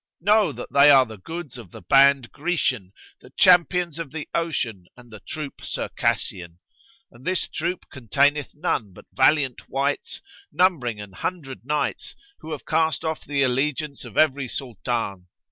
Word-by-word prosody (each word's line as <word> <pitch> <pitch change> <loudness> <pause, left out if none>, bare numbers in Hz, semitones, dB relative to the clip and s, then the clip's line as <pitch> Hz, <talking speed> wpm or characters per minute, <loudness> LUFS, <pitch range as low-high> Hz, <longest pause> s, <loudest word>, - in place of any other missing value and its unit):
Know 210 +3 +3
that - - -9
they 140 +1 +7
are 135 -2 +7
the 110 -3 -11
goods 160 - -7
of 110 -7 -12
the 110 +2 -12
band 135 +3 +4
Grecian, 140 - -1 0.3
the - - -16
champions 175 -2 +4
of 165 - -5
the 150 -1 -6
ocean 120 - -2
and 120 -1 -16
the 110 - -9
troop 150 +7 -7
Circassian; 85 -1 -2 0.5
and 120 +2 -17
this 185 +3 0
troop 170 +3 -3
containeth 140 +3 +1
none 130 - -2
but - - -15
valiant 135 -1 +2
wights 140 +1 -2 0.3
numbering 135 - +1
an 100 -2 -9
hundred 135 - -5
knights, 150 0 -2 0.2
who 160 - -9
have 150 - -6
cast 160 0 0
off 160 -1 -3
the 140 -1 0
allegiance 140 +3 -1
of - - -10
every 140 -3 +3
Sultan. 115 -6 -4
140 Hz, 155 wpm, -24 LUFS, 120-160 Hz, 0.5 s, they